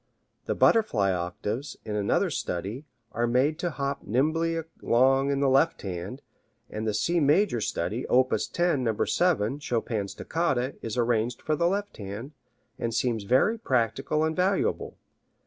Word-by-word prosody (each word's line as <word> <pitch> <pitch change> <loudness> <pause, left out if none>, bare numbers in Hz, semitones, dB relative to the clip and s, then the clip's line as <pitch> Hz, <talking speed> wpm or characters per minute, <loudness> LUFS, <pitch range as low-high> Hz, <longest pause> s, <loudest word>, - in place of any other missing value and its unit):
The - - -1
Butterfly 115 - +3
octaves, 100 +9 -4
in 105 -1 -3
another 105 -1 +1
study, 100 - -4 0.3
are 120 0 0
made 135 +6 +2
to 175 - -1
hop 140 -3 -3
nimbly 160 +8 0 0.2
along 135 +3 +3
in 140 0 0
the 140 - +3
left 135 +5 +3
hand, 95 +7 -5 0.5
and 110 +1 -3
the 105 - 0
C 170 +10 +1
major 150 - +3
study, 105 +6 -2
op. 130 +1 +3
10, 175 -6 0
No. 110 -3 0
7, 145 -8 +1
Chopin's 115 -7 -2
Toccata, 140 -6 -1
is 115 +1 -4
arranged 120 0 0
for 155 - +1
the 170 +3 +2
left 200 +3 -2
hand, 105 +7 -7 0.5
and 115 -1 -2
seems 115 -3 0
very 135 - +3
practical 135 - 0
and 160 0 0
valuable. 190 +2 0
130 Hz, 150 wpm, -27 LUFS, 110-155 Hz, 0.5 s, Butterfly